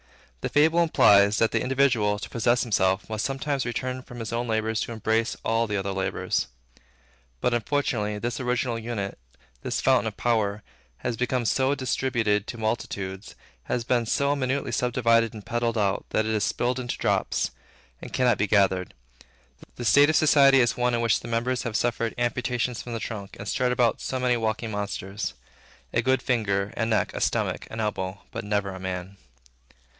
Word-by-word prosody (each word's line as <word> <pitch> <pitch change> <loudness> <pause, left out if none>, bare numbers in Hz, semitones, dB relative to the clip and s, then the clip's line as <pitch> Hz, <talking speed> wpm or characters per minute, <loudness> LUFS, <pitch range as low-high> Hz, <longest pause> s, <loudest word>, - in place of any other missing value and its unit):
The - - -2
fable 160 +4 +4
implies, 100 -10 +5
that 115 - +2
the 110 - +1
individual, 125 -6 +2
to 105 - -6
possess 120 +1 +1
himself, 95 -3 +1
must 110 -1 -3
sometimes 135 +1 -1
return 130 +2 -3
from 120 -1 -12
his 115 0 -5
own 120 +1 -1
labor 110 0 0
to 115 - -2
embrace 115 +1 0
all 115 +1 +1
the 105 -1 -1
other 100 0 -2
laborers. 95 0 -1 0.9
But 125 - +1
unfortunately, 115 -4 0
this 120 +4 -3
original 125 -2 -1
unit, 110 - -4 0.4
this - - -2
fountain - - +3
of - - -5
power, 105 -3 0 0.3
has 120 - -3
been 125 +1 -1
so 135 +4 +2
distributed 120 -6 0
to 120 - -6
multitudes, 100 -3 -4 0.3
has 120 - -1
been 120 -1 +1
so 140 +4 +1
minutely 135 -1 -1
subdivided 115 -2 +2
and 105 - -9
peddled 120 -1 -1
out, 100 -2 0
that 110 - +1
it 110 - -1
is 105 -1 +1
spilled 125 +4 0
into 120 -1 -4
drops, - - 0 0.5
and - - -8
cannot 125 -2 +2
be 105 - +2
gathered. 95 -4 +2 0.8
The 120 - -6
state 145 +5 +6
of 155 - +2
society 140 -3 +6
is 120 - +2
one 125 0 +1
in 115 - 0
which 115 -2 +2
the - - -9
members 120 +2 0
have 115 -2 -4
suffered 115 -2 -1
amputation 125 +1 -1
from 120 0 -6
the 115 - -2
trunk, 105 -4 -6
and 100 - -8
strut 125 +4 +1
about 120 -2 +2
so 130 - -3
many 125 -1 +2
walking 110 0 -2
monsters, 100 - -4 0.6
a 120 - +2
good 130 +2 +1
finger, 100 -5 0
a 115 - 0
neck, 110 -2 +1
a - - -4
stomach, - - -1
an 110 - -7
elbow, 100 -3 -3
but - - -5
never 105 -1 -1
a 95 - -8
man. 95 +1 -5
115 Hz, 180 wpm, -26 LUFS, 105-125 Hz, 0.9 s, state